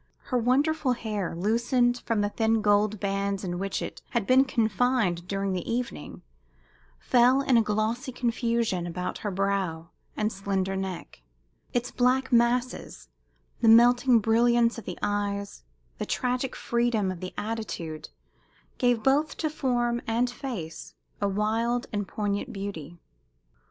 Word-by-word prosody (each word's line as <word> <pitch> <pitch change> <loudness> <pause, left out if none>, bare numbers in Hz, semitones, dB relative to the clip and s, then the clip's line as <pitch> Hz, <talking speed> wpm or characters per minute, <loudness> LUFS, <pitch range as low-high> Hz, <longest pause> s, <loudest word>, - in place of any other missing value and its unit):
Her - - +4
wonderful 270 +3 +2
hair, 210 -7 -3
loosened 240 +6 +1
from 225 -3 +1
the 205 - +1
thin 225 0 +1
gold 205 0 +2
bands 200 0 -1
in 175 -1 -3
which 195 0 -2
it - - -7
had 235 -5 -1
been 260 +3 +5
confined 220 -6 +1
during 195 0 -1
the 180 +2 -3
evening, 235 -10 -4 0.7
fell 250 - +4
in 265 - +3
a 230 - +6
glossy 220 +5 -1
confusion 235 -6 -1
about 180 +1 -4
her 210 - -3
brow 190 -4 -2 0.3
and 215 +1 0
slender 195 -1 -2
neck; 190 - -5 0.5
its 245 0 -1
black 260 +2 +1
masses, 240 +1 0 0.5
the 230 - +2
melting 245 +2 +6
brilliance 235 +2 +3
of 220 - -12
the 180 - -6
eyes, 200 -1 -2 0.4
the - - -2
tragic 250 +1 -1
freedom 235 -5 0
of 185 - -7
the 185 +1 -7
attitude 205 -8 -5 0.7
gave 245 -3 +2
both 290 +4 +2
to 310 -2 -1
form 240 -5 0
and 235 +2 +1
face 230 - -7 0.3
a 200 - +2
wild 225 +4 0
and 205 -2 -2
poignant 205 0 -2
beauty. 175 -5 -6
225 Hz, 140 wpm, -27 LUFS, 195-245 Hz, 0.7 s, a